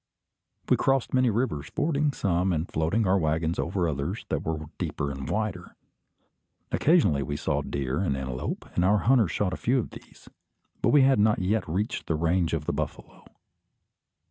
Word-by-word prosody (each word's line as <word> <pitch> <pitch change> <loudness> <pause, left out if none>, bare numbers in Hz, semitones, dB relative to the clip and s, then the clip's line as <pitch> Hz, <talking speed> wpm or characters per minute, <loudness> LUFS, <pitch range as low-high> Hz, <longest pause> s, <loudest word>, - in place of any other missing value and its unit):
We - - +4
crossed 135 -2 +1
many 130 -1 +4
rivers, 110 - -1
fording 150 -2 0
some, 95 -6 0
and 80 +1 -1
floating 80 +8 0
our 95 +1 +3
waggons 80 +1 0
over 90 0 0
others 70 -3 -3
that - - -1
were 80 -1 -3
deeper 70 - -2
and 70 -1 -6
wider. - - -3 1.0
Occasionally 150 - +3
we 70 +1 -3
saw - - -1
deer 70 +1 -2
and 80 -8 0
antelope, 65 -1 -4
and 90 - +1
our 100 +3 +4
hunters 120 -6 +4
shot 95 -1 -1
a - - -3
few 125 +3 +1
of 120 - -2
these; - - -14 0.5
but - - +3
we 145 -2 +6
had 135 -4 +4
not 105 +1 +4
yet 95 0 0
reached 100 +8 -2
the 80 - +1
range 85 +1 +1
of 80 -2 -2
the - - -1
buffalo. - - -6
90 Hz, 175 wpm, -27 LUFS, 80-110 Hz, 1.0 s, we